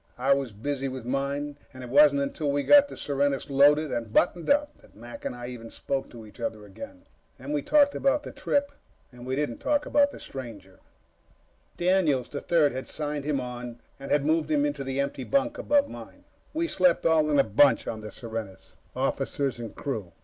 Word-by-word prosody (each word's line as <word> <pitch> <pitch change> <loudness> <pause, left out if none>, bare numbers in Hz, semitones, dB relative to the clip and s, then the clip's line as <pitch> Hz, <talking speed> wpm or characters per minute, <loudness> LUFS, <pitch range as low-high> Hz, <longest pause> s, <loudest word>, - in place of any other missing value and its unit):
I 135 +3 +3
was 135 -3 -2
busy 135 +6 -3
with 130 -2 -6
mine, 140 +2 -2
and 130 -2 -10
it 125 - -8
wasn't 145 0 +6
until 140 +1 -2
we'd 145 0 0
gotten 290 -1 +7
the - - -9
Serenus 140 0 -1
loaded 145 +2 +4
and 115 -2 -3
buttoned 175 +6 +1
up 295 +1 +2
that - - -22
Mac 120 +3 -11
and - - -3
I 120 0 -7
even 115 -2 -9
spoke 135 +3 -4
to 115 -2 -11
each 105 - -16
other 110 -2 -4
again. 280 - -11 0.3
Then 135 +2 -7
we 150 -1 0
talked 290 - +4
about 285 +2 +1
the - - -7
trip. 285 0 -1 0.4
We 125 +2 -5
didn't 140 -5 -2
talk 295 0 0
about 285 -1 +3
the - - -11
stranger. 110 -8 -9 1.0
Daniels, 175 -8 +2
the 140 - -5
Third, 160 -4 +3
had 130 +1 -6
signed 150 -2 -4
him 145 -2 0
on 125 -1 -7 0.2
and 135 - -8
had 145 -1 +2
moved 155 0 +1
him 145 -2 +2
into 145 -1 -2
the 135 0 -3
empty 140 -1 -2
bunk 280 - 0
above 285 -1 +2
mine. - - -11 0.3
We 330 +2 -1
slept 180 - +2
all 160 -2 +3
in 145 - +2
a 140 - +6
bunch 125 +6 +4
on 110 -1 -5
the 105 - -7
Serenus 110 -5 -8 0.2
officers 135 -4 -1
and 115 -3 -7
crew. 110 - -5
140 Hz, 200 wpm, -27 LUFS, 125-155 Hz, 1.0 s, gotten